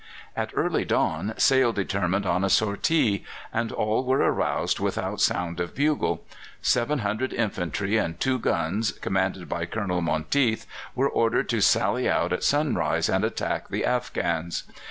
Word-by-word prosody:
At - - -2
early - - +1
dawn 110 +2 0
Sale 130 -3 +4
determined 100 -1 -1
on 90 0 +1
a 95 - +1
sortie, 105 +2 +2 0.3
and 115 0 -1
all 110 +4 0
were 130 +1 +2
aroused - - +1
without - - -2
sound 85 -1 +1
of 85 0 -3
bugle. 150 +1 0 0.3
Seven 125 +5 +1
hundred 110 +6 -1
infantry 100 -1 -1
and 85 -6 -2
two 130 -1 +1
guns, 100 +1 0
commanded 95 -1 -2
by 85 -1 -3
Colonel 90 -3 -2
Monteath, 110 - +1 0.3
were 135 +2 +2
ordered 115 -4 +1
to - - +1
sally - - +3
out - - +1
at - - -2
sunrise 90 - +1
and 95 +2 +1
attack 110 - -2
the - - -1
Afghans. 85 0 -1
100 Hz, 150 wpm, -25 LUFS, 90-120 Hz, 0.3 s, Sale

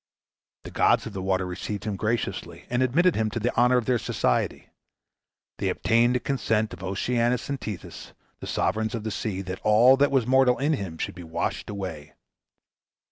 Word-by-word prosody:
The - - -9
gods - - +3
of 110 - -7
the 95 - -4
water 95 0 0
received 95 +3 -5
him 105 -2 -2
graciously, 110 +4 -3
and 120 +1 +1
admitted 165 +8 +3
him 110 0 0
to 115 - -3
the 120 +3 -1
honor 125 +1 +4
of 120 - 0
their 125 -2 +2
society. - - -1 0.9
They - - 0
obtained 120 +2 +2
the - - +2
consent 110 -6 -1
of 90 - -10
Oceanus 120 +7 0
and 140 -1 -3
Tethys, 105 -5 -7 0.3
the - - -8
sovereigns 110 +2 -1
of 110 - -5
the 110 - -3
sea, 100 -3 -3
that 95 0 -6
all 115 +5 +6
that 145 +1 +4
was 135 -4 +2
mortal 130 0 +4
in 145 +3 +1
him 95 - -4
should - - -3
be 90 0 -10
washed 85 +1 -3
away. 95 -8 -6
110 Hz, 190 wpm, -26 LUFS, 95-125 Hz, 0.9 s, all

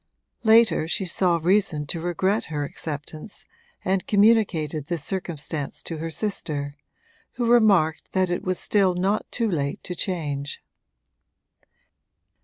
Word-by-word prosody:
Later 225 -7 +5
she 190 +3 -1
saw 175 0 +2
reason 170 -3 +1
to 165 +3 -3
regret 185 +5 0
her 150 -2 -3
acceptance 155 +5 -6 0.4
and 190 0 0
communicated 195 -9 +3
this 170 -4 -2
circumstance 160 -4 -4
to 165 - -5
her 165 +1 -3
sister, 150 -6 -3 0.6
who 240 - -2
remarked 205 -10 +3
that 185 -2 +1
it 175 - -2
was 185 -1 -1
still 195 -3 +2
not 195 +4 0
too 230 -2 0
late 145 -8 -2
to 180 - -5
change. 145 -6 -3
175 Hz, 125 wpm, -24 LUFS, 155-200 Hz, 0.6 s, Later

